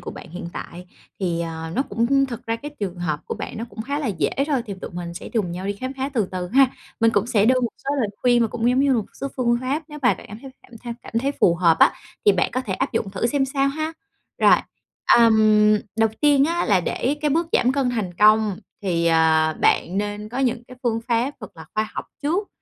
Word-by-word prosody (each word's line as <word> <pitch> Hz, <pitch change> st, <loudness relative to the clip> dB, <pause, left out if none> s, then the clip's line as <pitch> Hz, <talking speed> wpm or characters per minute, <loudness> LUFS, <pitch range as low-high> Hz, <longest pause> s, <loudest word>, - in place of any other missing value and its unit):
của -, -, -7 dB
bạn 170 Hz, -, -11 dB
hiện 175 Hz, 0 st, -6 dB
tại. 180 Hz, +1 st, -8 dB, 0.3 s
Thì, 170 Hz, -3 st, -1 dB
à, 165 Hz, -1 st, -5 dB
nó 265 Hz, -, +2 dB
cũng 275 Hz, +2 st, +1 dB
thực 240 Hz, -4 st, -8 dB
ra 225 Hz, 0 st, 0 dB
cái 290 Hz, +5 st, -8 dB
trường 190 Hz, -3 st, -3 dB
hợp 155 Hz, -4 st, -2 dB
của -, -, -3 dB
bạn -, -, -6 dB
nó 225 Hz, -, -4 dB
cũng 220 Hz, -, -6 dB
khá 280 Hz, +5 st, -3 dB
là 290 Hz, -, -2 dB
dễ 160 Hz, -9 st, 0 dB, 0.2 s
thôi, 275 Hz, -6 st, 0 dB
thì 200 Hz, -, -5 dB
tụi -, -, -6 dB
mình 175 Hz, -1 st, -6 dB
sẽ -, -, -8 dB
chùng 210 Hz, -7 st, -1 dB
nhau 185 Hz, +2 st, -5 dB
đi 200 Hz, -, 0 dB
khám 255 Hz, +6 st, -5 dB
phá 265 Hz, +1 st, -2 dB
từ 215 Hz, -6 st, +1 dB
từ 180 Hz, -1 st, -3 dB
ha! 265 Hz, +5 st, +5 dB, 0.3 s
Mình 230 Hz, 0 st, +5 dB
cũng 205 Hz, 0 st, +1 dB
sẽ 215 Hz, -4 st, +2 dB
đưa 255 Hz, +1 st, +4 dB
một 240 Hz, -, 0 dB, 0.2 s
số 275 Hz, -, -1 dB
lời 225 Hz, -, +1 dB
khuyên 240 Hz, -1 st, +4 dB
mà 225 Hz, -, +1 dB
cũng 235 Hz, +2 st, -1 dB
giống 255 Hz, +2 st, +2 dB
như 280 Hz, -1 st, +3 dB
một 220 Hz, -4 st, 0 dB, 0.2 s
số -, -, -2 dB
phương 240 Hz, -2 st, +2 dB
pháp, 275 Hz, +5 st, -1 dB
nếu 300 Hz, -1 st, -8 dB
mà 240 Hz, -6 st, +4 dB
bạn -, -, -13 dB
cảm 210 Hz, -, -9 dB
thấy 270 Hz, -, -9 dB
cảm -, -, -21 dB
theo 240 Hz, -1 st, -4 dB
cảm -, -, -11 dB
thấy 275 Hz, +3 st, 0 dB
phù 170 Hz, -, +5 dB
hợp 170 Hz, -2 st, +3 dB
á -, -, +6 dB, 0.3 s
thì 205 Hz, -, +8 dB
bạn 185 Hz, -, +1 dB
có 255 Hz, -, -1 dB
thể 210 Hz, -, -4 dB
áp 270 Hz, +5 st, -2 dB
dụng 195 Hz, -, -1 dB
thử 195 Hz, +4 st, -1 dB
xem 275 Hz, +2 st, +1 dB
sao 275 Hz, +1 st, 0 dB
ha! 310 Hz, +3 st, -3 dB, 0.5 s
Rồi. -, -, +6 dB, 0.6 s
Ừm, 215 Hz, -2 st, +5 dB, 0.2 s
đầu 225 Hz, 0 st, +3 dB
tiên 290 Hz, -2 st, +5 dB
á 340 Hz, +3 st, 0 dB
là 195 Hz, -4 st, +3 dB
để 265 Hz, +10 st, -1 dB
cái 295 Hz, -1 st, +1 dB
bước 325 Hz, +2 st, +1 dB
giảm 250 Hz, -, +3 dB
cân 270 Hz, -2 st, +1 dB
thành 210 Hz, -7 st, -3 dB
công 210 Hz, 0 st, +4 dB, 0.2 s
thì, 170 Hz, -3 st, 0 dB
à, 160 Hz, -1 st, +4 dB
bạn 180 Hz, +4 st, +1 dB
nên 205 Hz, +1 st, -3 dB
có 245 Hz, +4 st, -5 dB
những 245 Hz, -3 st, 0 dB
cái 255 Hz, +1 st, -13 dB
phương 230 Hz, -2 st, 0 dB
pháp 240 Hz, +3 st, +1 dB
thật 215 Hz, -6 st, -10 dB
là 160 Hz, -, -10 dB
khoa 215 Hz, 0 st, 0 dB
học -, -, -4 dB, 0.2 s
trước. 350 Hz, +8 st, 0 dB
225 Hz, 260 wpm, -22 LUFS, 190-265 Hz, 0.6 s, thì